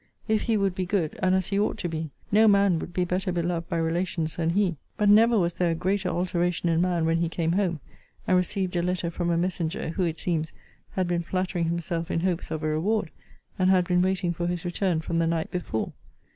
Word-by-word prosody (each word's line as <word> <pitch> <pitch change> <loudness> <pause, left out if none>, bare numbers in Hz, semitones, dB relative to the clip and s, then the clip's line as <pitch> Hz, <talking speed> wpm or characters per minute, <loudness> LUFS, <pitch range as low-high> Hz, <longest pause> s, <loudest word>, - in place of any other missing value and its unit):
If 220 -1 +2
he 225 -2 +1
would 195 -2 +1
be 185 0 -3
good, 175 -6 -1
and 185 0 +3
as 185 -1 0
he 200 -1 +1
ought 210 - 0
to - - -3
be, 160 -1 -4 0.2
no 215 +2 +6
man 200 -4 +4
would 175 - -6
be 180 0 0
better 185 +2 -1
beloved 170 -1 -2
by 170 - -1
relations 165 -1 -1
than 165 -1 0
he. 180 -2 +1 0.2
But 210 -1 +3
never 225 +3 +6
was 175 -3 +1
there 175 0 +1
a 165 - 0
greater 190 +3 0
alteration 175 -1 0
in 165 0 +2
man 175 -2 +1
when 165 0 +2
he 170 -1 0
came 165 -1 -1
home, 180 -3 0 0.5
and 185 - +3
received 180 0 0
a 175 - +2
letter 180 -1 -1
from 175 0 -2
a 170 - +2
messenger, 170 -2 -2
who, 170 - -3
it 165 -2 -1
seems, 160 -3 -2 0.4
had 185 -2 0
been 175 -1 0
flattering 180 0 -1
himself 170 0 -2
in 165 - 0
hopes 180 -1 -1
of 155 0 -4
a - - +1
reward, 170 +4 0 0.5
and 185 0 +3
had 185 -2 +4
been 180 -1 +3
waiting 185 -1 +1
for 175 +1 -2
his 175 +1 -3
return 175 -2 0
from 165 +1 -1
the 165 - +2
night 165 -1 -1
before. 170 -11 -3
175 Hz, 235 wpm, -26 LUFS, 165-185 Hz, 0.5 s, no